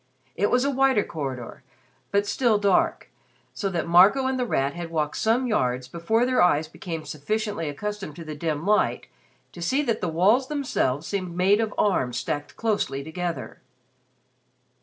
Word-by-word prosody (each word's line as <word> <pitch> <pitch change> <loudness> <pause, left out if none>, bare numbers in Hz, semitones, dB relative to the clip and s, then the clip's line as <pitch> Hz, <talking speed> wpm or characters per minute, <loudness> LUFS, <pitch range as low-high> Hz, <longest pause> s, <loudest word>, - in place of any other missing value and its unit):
It 205 +3 +1
was 250 +2 +2
a 280 - +1
wider 265 -5 +3
corridor, 135 -6 -6 0.5
but 200 0 +1
still 230 0 +2
dark, 200 -1 +1 0.4
so 200 - -2
that 175 -3 -2
Marco 190 +10 +6
and 260 0 0
The 250 - 0
Rat 140 -7 0
had 175 -1 -6
walked 155 -2 -2
some 230 +4 +2
yards 125 - 0
before 170 - 0
their 255 -4 +2
eyes 160 -3 +3
became 165 0 -7
sufficiently 205 +2 -3
accustomed 200 +1 -5
to 165 - -8
the 155 -1 -6
dim 155 +1 -3
light 210 +1 +2 0.5
to 175 - -11
see 265 +12 +1
that 235 -5 -1
the 180 - -1
walls 205 +11 +3
themselves 255 - -1
seemed 185 -3 -4
made 195 +4 +4
of 220 -2 -1
arms 130 -12 +1
stacked 145 0 -4
closely 205 -11 -1
together. 170 +2 -5
185 Hz, 165 wpm, -25 LUFS, 155-220 Hz, 0.5 s, Marco